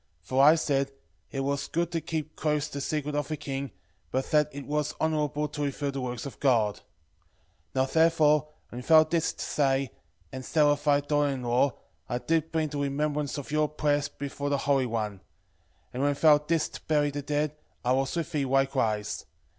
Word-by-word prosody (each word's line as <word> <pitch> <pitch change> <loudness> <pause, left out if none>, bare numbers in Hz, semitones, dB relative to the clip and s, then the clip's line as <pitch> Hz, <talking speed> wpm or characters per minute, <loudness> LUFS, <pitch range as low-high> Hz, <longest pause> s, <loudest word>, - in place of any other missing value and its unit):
For 130 +1 +2
I 150 +3 +8
said, 140 -3 0 0.4
It 135 - -2
was 140 +1 -1
good 170 0 -1
to 165 -1 -1
keep 155 -1 -4
close 150 -1 0
the 140 -1 -6
secret 150 +1 -2
of 145 0 -1
a 155 - -2
king, 135 -1 -4 0.4
but 130 0 -2
that 150 -1 +4
it 140 0 -7
was 150 0 -1
honourable 150 -1 0
to 150 - -5
reveal 140 0 -1
the 135 -1 -4
works 125 -1 -4
of 140 - -8
God. 115 -7 +2
12:12 - - -19 0.9
Now 130 0 +3
therefore, 150 0 +3 0.2
when 125 - -7
thou 155 +4 +7
didst 160 +1 -1
pray, 135 -3 +2 0.4
and 130 - -6
Sara 145 0 +3
thy 145 -1 +4
daughter 145 0 +1
in 130 -2 -4
law, 125 +2 +2 0.3
I 120 - 0
did 160 +4 0
bring 160 -2 0
the 145 - -4
remembrance 145 +1 -1
of 145 0 -6
your 150 0 +2
prayers 145 -1 0
before 145 0 -4
the 140 - +1
Holy 135 -2 +1
One: 105 -4 -3 0.7
and 125 - -3
when 145 0 +2
thou 150 0 +6
didst 155 +1 -2
bury 150 -2 +2
the 145 +1 -4
dead, 150 +1 -1 0.3
I 125 - +2
was 135 +3 +1
with 170 -2 -2
thee 145 -3 0
likewise. 130 -6 0
145 Hz, 190 wpm, -28 LUFS, 135-150 Hz, 0.9 s, I